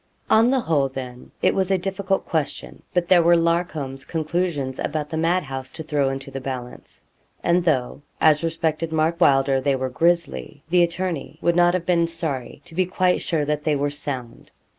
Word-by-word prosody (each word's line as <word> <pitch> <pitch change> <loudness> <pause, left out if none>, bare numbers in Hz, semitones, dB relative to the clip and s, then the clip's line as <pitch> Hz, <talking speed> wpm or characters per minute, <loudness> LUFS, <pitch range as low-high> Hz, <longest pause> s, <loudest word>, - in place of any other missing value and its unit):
On 225 +2 +6
the 265 -1 +2
whole, 145 -8 +1
then, 125 -2 -8
it - - +4
was 190 -1 0
a 190 - +3
difficult 195 +1 -2
question. 155 -3 -3
But 180 -1 0
there 180 -1 +6
were 170 +1 +5
Larcom's 165 -5 -1
conclusions 160 -4 -2
about 150 -1 -3
the 160 - -2
mad 170 +3 +2
house 135 -1 -6
to 160 - -6
throw 145 -3 +1
into 135 0 -5
the 135 0 -5
balance. 125 -2 -7 0.4
And 175 +1 +3
though, 135 -5 0 0.2
as 155 -1 +4
respected 165 -1 -1
Mark 160 +2 0
Wylder, 135 -2 +4
they 140 0 +1
were 130 0 -2
grisly, 170 0 0
the 180 0 +5
attorney 170 -3 -2
would 170 +1 +1
not 175 0 +4
have 175 -2 -2
been 170 -2 +2
sorry 160 -7 -5
to - - -13
be 185 +1 +1
quite 185 -1 +1
sure 155 -4 0
that 150 0 -1
they 155 -2 +1
were 145 +1 0
sound. 130 -5 -5
160 Hz, 190 wpm, -23 LUFS, 135-175 Hz, 0.4 s, On